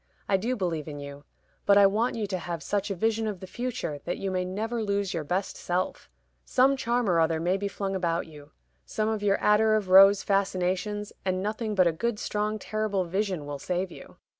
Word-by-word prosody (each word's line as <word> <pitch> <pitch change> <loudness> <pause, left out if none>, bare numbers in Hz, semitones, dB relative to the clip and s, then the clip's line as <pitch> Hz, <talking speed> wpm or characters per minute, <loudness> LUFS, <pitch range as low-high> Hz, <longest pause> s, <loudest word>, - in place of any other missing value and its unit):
I 195 - +3
do 235 +7 0
believe 170 - -2
in 145 -2 -6
you; 140 0 -9 0.4
but 200 0 +6
I 200 - +8
want 215 +5 +2
you 220 -2 -2
to 190 -2 -3
have 170 -1 -5
such 205 0 -1
a 195 - -2
vision 225 +3 0
of 205 -4 -4
the 190 - -8
future 225 -8 -4
that 175 - -3
you 195 - -3
may 185 -1 0
never 220 +6 -3
lose 200 -2 -1
your 165 -3 -2
best 180 +6 -2
self. 180 +1 -3 0.3
Some 265 +2 +3
charm 240 -2 0
or 175 -3 +3
other 160 0 +2
may 175 +3 +1
be 200 +1 -2
flung 195 -1 -3
about 170 -2 0
you 150 -2 -13 0.3
some 215 0 -2
of 220 -2 -2
your 200 -1 +2
attar 215 +1 +4
of 205 -3 -1
rose 195 +2 +8
fascinations 195 +1 -1
and 185 0 -1
nothing 215 +1 -2
but 185 -2 +5
a 170 - +4
good 235 +7 -2
strong 210 +1 -2
terrible 215 -2 -1
vision 185 -3 -2
will 145 -1 -5
save 180 +4 -2
you. - - -13
195 Hz, 215 wpm, -27 LUFS, 180-215 Hz, 0.4 s, I